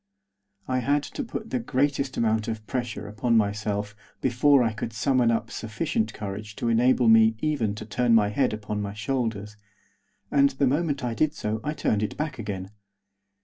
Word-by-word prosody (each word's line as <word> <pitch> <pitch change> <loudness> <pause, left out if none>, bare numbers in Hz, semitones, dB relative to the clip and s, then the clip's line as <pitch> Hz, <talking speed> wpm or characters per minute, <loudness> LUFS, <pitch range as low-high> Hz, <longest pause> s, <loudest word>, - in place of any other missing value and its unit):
I 130 0 +1
had 145 +4 +1
to 285 - -5
put 225 -2 -6
the 255 - 0
greatest 140 - 0
amount 110 -1 +1
of 110 -1 -4
pressure 120 -4 -4
upon 115 +3 +1
myself 105 0 -1 0.2
before 130 +2 +4
I 115 -2 0
could 110 +1 -5
summon 125 0 +2
up 115 -1 0
sufficient 110 0 -2
courage 105 +1 -6
to 120 - -1
enable 120 +1 +3
me 110 0 +6
to 110 +6 -6
even 120 -10 0
turn 115 +3 +1
my 105 -2 +4
head 125 +5 +1
upon 105 -1 -4
my 100 0 -5
shoulders, 110 -3 -3 0.7
and 140 -1 +5
the 140 +1 0
moment 145 0 0
I 120 -2 -1
did 155 +5 +1
so 105 +1 -3
I 150 - -2
turned 105 -8 0
it 105 - -3
back 150 -4 -3
again. 100 -3 -5
115 Hz, 180 wpm, -26 LUFS, 105-135 Hz, 0.7 s, me